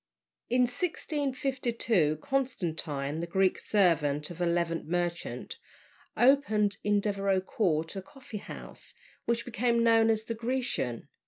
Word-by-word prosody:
In 250 +1 +3
1652 255 - 0
Constantine, 160 - -2
the 170 - -3
Greek 190 +1 +2
servant 150 -7 +2
of 175 +1 -8
a 175 - +2
Levant 170 -1 0
merchant, 175 0 -3 0.6
opened 220 -6 +4
in 205 0 +3
Devereux 195 -2 +1
Court 165 -5 0
a 195 - -3
coffee 255 +2 -10
house, - - -9 0.3
which 235 0 0
became 235 0 +1
known 225 -1 +5
as 220 -1 +2
"The 230 - -3
Grecian." 230 - -2
205 Hz, 120 wpm, -29 LUFS, 170-240 Hz, 0.6 s, known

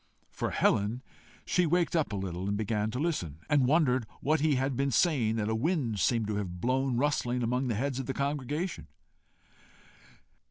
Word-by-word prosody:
For - - -2
Helen, 110 +6 +1 0.4
she 180 -2 +2
waked 175 +2 +1
up 155 -8 +1
a - - -2
little, 95 0 -3
began 105 +1 -1
to 120 - -4
listen, 130 - -2
and 145 -4 +3
wondered 130 -6 +2
what 155 +2 +1
he 150 -1 +2
had 135 +1 0
been 140 +2 +1
saying 130 -6 +2
that 105 -2 -1
a 110 - 0
wind 120 - 0
seemed 115 0 +2
to 105 -1 -2
have 90 -4 -4
blown 130 +3 0
rustling 125 -3 0
among 125 +3 0
the 115 - 0
heads 135 +3 -1
of 130 - -4
the 135 - -1
congregation. 145 +5 -2
125 Hz, 175 wpm, -30 LUFS, 110-145 Hz, 0.4 s, and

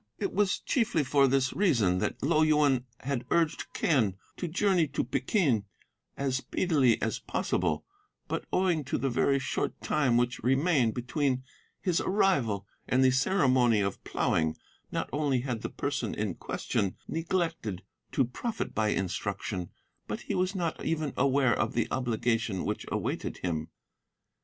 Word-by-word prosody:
It 385 - -2
was 205 -2 +2
chiefly 220 - +1
for 140 +1 +4
this 135 0 +2
reason 115 - +2
that - - -2
Lo 155 +2 +3
Yuen 150 -5 +3 0.2
had 135 -2 -2
urged 165 -2 +1
Quen 115 - +2 0.2
to 180 - -3
journey 185 -1 +2
to - - -1
Peking 130 - +1 0.5
as 135 -2 0
speedily 135 -5 +2
as - - -1
possible, - - -1 0.4
but - - -3
owing 180 -5 +2
to - - -1
the 135 -1 -1
very 140 +3 +3
short 135 - -2
time 140 -6 +2
which 120 0 +1
remained 135 -1 +2
between 130 +1 0 0.4
his 180 -4 +1
arrival 135 - +1 0.2
and 130 +1 +3
the 130 - +5
ceremony 130 - +3
of 100 -1 -2
ploughing, 80 -1 0 0.4
not - - -2
only 145 -4 +1
had 125 -4 -3
the - - -3
person - - -2
in - - -1
question 95 -2 -2
neglected 165 - -2 0.3
to 135 - +3
profit 220 - -4
by 110 -1 +1
instruction, 95 -1 -2 0.4
but - - -4
he - - -4
was 185 +2 0
not 170 -4 -2
even 155 -4 -1
aware 135 -2 +3
of 110 - -1
the 115 -1 +1
obligation 115 -4 0
which - - -3
awaited - - -2
him. 80 -3 -1
135 Hz, 150 wpm, -29 LUFS, 115-160 Hz, 0.5 s, the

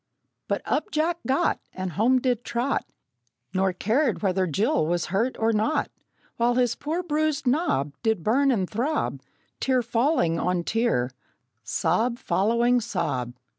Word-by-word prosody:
But - - -1
up - - -1
Jack 330 0 0
got, 265 +1 +2
And 185 -1 -4
home 240 - +3
did 245 -2 0
trot, 245 +4 -1 0.7
Nor 190 0 +2
cared 225 +7 0
whether 190 -1 +1
Jill 210 - +1
was 175 0 0
hurt 230 +6 +1
or 225 0 +2
not; 220 +8 0 0.5
While 240 +1 +2
his 245 -2 +2
poor 320 +8 -3
bruised 310 -2 0
knob 250 - +1
Did 220 -7 0
burn 275 - +3
and 200 -8 +1
throb, 260 - -1 0.4
Tear 255 -2 +1
falling 230 - +1
on 180 0 0
tear, 220 - 0 0.5
sob 180 - 0
following 235 +2 +2
sob! 130 - -2
235 Hz, 140 wpm, -25 LUFS, 185-265 Hz, 0.7 s, home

